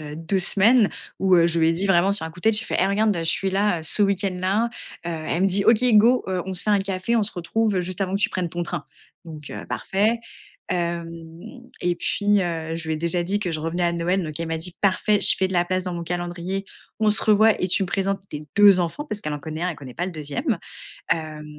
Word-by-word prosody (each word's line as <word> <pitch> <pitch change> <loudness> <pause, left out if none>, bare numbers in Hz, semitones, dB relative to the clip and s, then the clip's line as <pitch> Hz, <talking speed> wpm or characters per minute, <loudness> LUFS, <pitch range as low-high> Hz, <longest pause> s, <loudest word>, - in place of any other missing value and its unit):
heu, 150 -1 -8
2 165 +4 -1
semaines 210 +4 +4 0.3
où, 190 -1 +3
heu, 170 -1 +5
je 170 0 0
lui 160 0 +3
ai - - +3
dit 180 +4 -1
vraiment 190 +1 +3
sur 200 -5 -4
un 160 - -5
coup 170 +3 -14
de - - -27
tête, 220 -1 +4
j'ai 215 - -1
fait: - - -1
«Hé, - - +3
regarde, 205 +1 +1
je 165 - -2
suis 190 +3 +3
là 195 -3 0
ce 185 +6 +3
week-end 195 -1 0
là, 195 +5 +1
heu». - - -4 0.4
Elle 165 +1 -2
me 195 - +4
dit: 195 +1 +3
«OK, 230 +1 +5
go, 235 +4 +5
heu, 185 -1 -1
on 190 - -4
se 180 - 0
fait 215 - -1
un 205 - +4
café, 195 +4 -1
on 225 - +2
se 205 - -4
retrouve 200 +2 -1
juste 180 +2 -5
avant 190 -1 -1
que 200 - -1
tu - - +2
prennes 180 -2 -2
ton 175 +1 -4
train». 170 -3 -4 0.4
Donc 155 -3 -10
heu, - - -7
parfait. 210 +5 0 0.5
Hem, 170 -2 -2 0.7
et 175 0 +1
puis, 205 +2 +1
heu, 165 -2 -3
je 165 -1 -6
lui 160 - 0
ai - - -3
déjà 170 +2 +1
dit 195 +4 -1
que 180 -5 -2
je 155 - -3
revenais 170 +3 -2
à 170 - +1
Noël, 175 +3 0
donc 155 -1 -5
elle 165 - -3
m'a 165 0 -2
dit: 175 +2 -5
«Parfait, 205 +1 +2
je - - +6
fais 190 - +1
de 190 - -6
la 175 0 +3
place 185 +1 -1
dans 180 -2 -3
mon 170 0 -5
calendrier, 175 +2 -4 0.4
on 215 -1 +3
se 210 - +1
revoit 215 0 +4
et 185 - 0
tu 185 - +1
me 185 - -2
présentes 195 +1 -1
tes 150 0 -7
2 200 -2 +7
enfants», 175 - -3
parce 210 - -4
qu'elle 150 - -4
en 150 - -3
connaît 155 +2 -6
1, 180 - 0
elle 165 - -7
connaît 130 -4 -11
pas 175 - -3
le 185 - -6
2e, 150 -3 -3 0.5
hem. 155 -2 -2
180 Hz, 270 wpm, -23 LUFS, 170-200 Hz, 0.7 s, 2